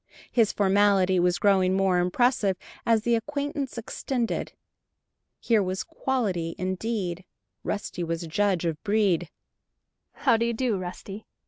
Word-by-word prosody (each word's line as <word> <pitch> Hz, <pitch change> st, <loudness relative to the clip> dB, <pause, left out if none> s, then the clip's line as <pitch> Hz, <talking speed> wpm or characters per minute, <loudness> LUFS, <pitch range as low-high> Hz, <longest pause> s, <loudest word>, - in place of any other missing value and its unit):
His 230 Hz, -4 st, +3 dB
formality 195 Hz, -2 st, +3 dB
was 175 Hz, 0 st, +2 dB
growing 190 Hz, -2 st, +3 dB
more 190 Hz, -2 st, +2 dB
impressive, 195 Hz, +1 st, +2 dB, 0.3 s
as 225 Hz, -2 st, +3 dB
the 235 Hz, -, +2 dB
acquaintance 285 Hz, +2 st, -2 dB
extended. 235 Hz, +1 st, -3 dB, 0.9 s
Here 225 Hz, -3 st, +2 dB
was 185 Hz, 0 st, -2 dB
"quality" 215 Hz, -, -2 dB
indeed 185 Hz, -1 st, -3 dB, 0.4 s
Rusty 200 Hz, -4 st, -3 dB
was 165 Hz, 0 st, -3 dB
a -, -, -6 dB
judge 185 Hz, +1 st, +1 dB
of 160 Hz, -3 st, -3 dB
"breed"! 200 Hz, -6 st, +1 dB, 0.8 s
"How 230 Hz, -, +2 dB
do 230 Hz, -, +1 dB
you 235 Hz, -, 0 dB
do, 240 Hz, -2 st, 0 dB
Rusty?" 195 Hz, +3 st, -7 dB
200 Hz, 130 wpm, -26 LUFS, 180-230 Hz, 0.9 s, His